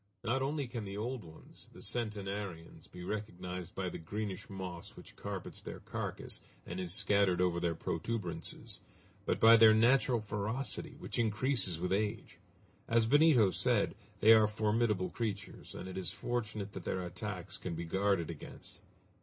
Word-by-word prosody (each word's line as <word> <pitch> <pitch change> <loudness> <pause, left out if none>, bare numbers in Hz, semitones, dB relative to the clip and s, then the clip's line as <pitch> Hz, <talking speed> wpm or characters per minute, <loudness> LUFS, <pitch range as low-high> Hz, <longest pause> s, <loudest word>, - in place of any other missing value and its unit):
Not 120 +3 +1
only 140 +1 0
can 120 -2 -5
the 100 0 -5
old 120 +2 -3
ones, 80 -2 -13
the - - -12
centenarians, 100 -6 -4
be 90 0 -9
recognized 90 -3 -5
by 95 -1 -1
the - - -5
greenish 100 +3 -4
moss 95 -3 -6
which - - -13
carpets - - -5
their - - -7
carcass - - -3 0.2
and 90 +2 -5
is 90 -2 -3
scattered 100 -1 +3
over 90 -1 +2
their 85 -1 0
protuberances, 90 +3 -3 0.5
but - - +1
by 115 +1 +9
their 110 -1 +8
natural 120 +1 +4
ferocity, 110 +4 -3
which - - -5
increases 110 - +1
with 90 +2 0
age. 105 +2 -2 0.5
As 115 -1 +4
Benito 135 -6 +6
said, - - +2 0.3
they 110 +1 +9
are 110 -1 +7
formidable 105 -2 +1
creatures, 100 -5 -4
and 95 - -6
it 95 0 -4
is 90 -2 -2
fortunate 110 -4 -3
that 95 - -6
their 95 - -1
attacks 90 +1 -4
can 90 -2 -4
be 85 +1 -4
guarded 95 -1 +1
against. 80 - -10
100 Hz, 160 wpm, -34 LUFS, 90-115 Hz, 0.5 s, by